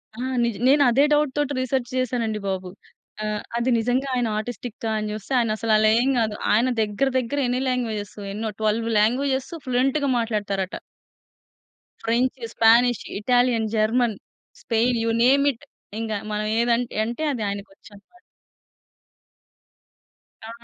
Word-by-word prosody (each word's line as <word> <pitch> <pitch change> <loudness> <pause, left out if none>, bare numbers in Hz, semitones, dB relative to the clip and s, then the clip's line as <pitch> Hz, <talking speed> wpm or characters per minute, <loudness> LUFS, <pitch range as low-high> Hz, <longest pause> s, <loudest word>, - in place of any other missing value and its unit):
ఆ - - -10 0.2
నిజ 235 -2 0
నేనదే 275 -1 +5
డౌట్‌తోటి 295 -1 +1
రిసర్చ్ 255 -1 -1
చేశానండి 235 -4 -1
బాబు. 190 -1 -3 0.5
ఆహ్, 210 0 -2 0.2
అది 235 +2 0
నిజంగా 245 +4 0
ఆయన 245 -2 +1
ఆటిస్టికా 230 0 -5
అని 215 0 -3
చూస్తే 215 +4 -8
ఆయనసలలా 215 -1 +2
ఏం 260 - +1
కాదు. 215 -2 0 0.2
ఆయన 235 +4 +3
దగ్గర, 215 +5 0
దగ్గర 255 +3 -3
ఎన్ని 250 +1 0
లాంగ్వేజెస్ 225 -5 -3 0.2
ఎన్నో 220 +1 -3
12 220 +1 +1
languages 265 +4 +1
ఫ్లూయెంట్‌గా 270 +3 +1
మాట్లాడుతారట. 205 -4 -2 1.3
French, 245 +3 0
Spanish, 235 +1 +4 0.2
Italian, 245 0 +2
German, 220 +1 +2 0.5
Spain 235 +1 +1
you 230 - 0
name 275 +3 +4
it 250 +5 -19 0.3
ఇంగా 220 -2 -2 0.2
మనం 210 0 -2
ఏది 235 +1 +2
అన్ 245 - -1 0.2
అంటే 240 +7 -4
అది 240 - -4
ఆయనకి 200 0 -6
వచ్చునమాట. 205 - -18 2.3
ఆ! - - -8
235 Hz, 130 wpm, -23 LUFS, 215-255 Hz, 2.3 s, నేనదే